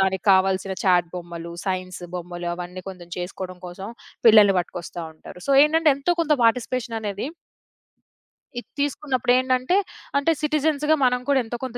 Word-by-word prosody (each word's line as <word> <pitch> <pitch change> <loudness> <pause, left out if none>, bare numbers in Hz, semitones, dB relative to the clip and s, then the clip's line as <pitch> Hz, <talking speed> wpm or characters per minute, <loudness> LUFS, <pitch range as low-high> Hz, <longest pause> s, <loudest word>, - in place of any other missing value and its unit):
దానికి 190 -1 0
కావాల్సిన 190 0 +1
చాట్ 175 -2 +3
బొమ్మలు, 170 -1 -7
సైన్సు 185 -1 -3
బొమ్మలు 175 0 -6
అవన్నీ 180 +1 -7
కొంచెం 175 -2 -10
చేసుకోవడం 180 0 -6
కోసం 190 +3 -8 0.4
పిల్లల్ని 210 -3 +7
పట్టుకొస్తా 175 0 -7
ఉంటారు. 180 +3 -12
సో, - - +4
ఏంటంటే 315 0 +3
ఎంతో 345 +6 0
కొంత 305 -1 +1
పార్టిసిపేషన్ 235 0 0
అనేది 205 +5 -3 1.3
ఇది - - -14
తీసుకున్నప్పుడేంటంటే 255 +1 +1 0.4
అంటే 330 +4 +2
సిటిజన్స్‌గా 300 0 +2
మనం 250 0 +2
కూడా 265 -2 +4
ఎంతో 240 +1 -5
కొంత 245 -1 -6
200 Hz, 140 wpm, -23 LUFS, 180-260 Hz, 1.3 s, పిల్లల్ని